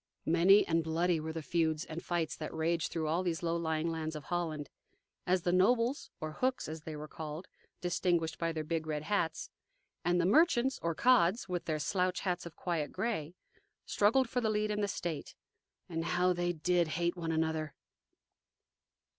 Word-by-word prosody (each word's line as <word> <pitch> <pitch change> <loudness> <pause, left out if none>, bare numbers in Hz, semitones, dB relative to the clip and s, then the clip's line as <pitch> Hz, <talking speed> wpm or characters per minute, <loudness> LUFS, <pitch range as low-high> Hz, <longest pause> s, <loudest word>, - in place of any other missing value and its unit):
Many 180 +5 +6
and 165 0 +2
bloody 165 +1 +1
were 160 +1 -4
the 160 -1 -5
feuds 160 -1 0
and 160 +1 -6
fights 170 -3 -1
that 155 - -5
raged 165 +1 0
through 160 -2 -2
all 165 +4 +1
those 175 -2 -2
low 165 0 +1
lying 160 -1 -1
lands 160 -1 -3
of 150 - -6
Holland, 155 -2 -2 0.6
as 180 -1 +2
the 175 - +2
nobles, 230 +8 +2
or 155 0 -4
"Hooks," 255 +10 -1
as 155 +1 -6
they 155 0 -6
were 150 +1 -7
called 155 +2 -7 0.3
distinguishable 175 -2 0
by 165 0 0
their 160 -1 -3
big 160 0 -2
red 150 -1 -2
hats, 165 -3 -1 0.5
and 175 0 +2
the 170 - +2
merchants, 265 - +4
or 165 -1 -1
"Cods," 230 -4 +4
with 180 -2 -3
their 155 -2 0
slouch 180 +4 0
hats 180 -2 -2
of 170 - -12
quiet 165 -5 -2
gray, 180 -8 -2 0.5
struggled 230 +5 +3
for 250 +1 -1
the 220 - +1
lead 210 0 0
in 210 0 -1
the 205 - +1
state. 170 -5 -4 0.5
And 165 -1 -3
how 180 +2 +2
they 175 0 0
DID 175 +1 +1
hate 170 +2 -1
one 165 -2 -3
another! 160 -1 -1
170 Hz, 185 wpm, -32 LUFS, 160-180 Hz, 0.6 s, Many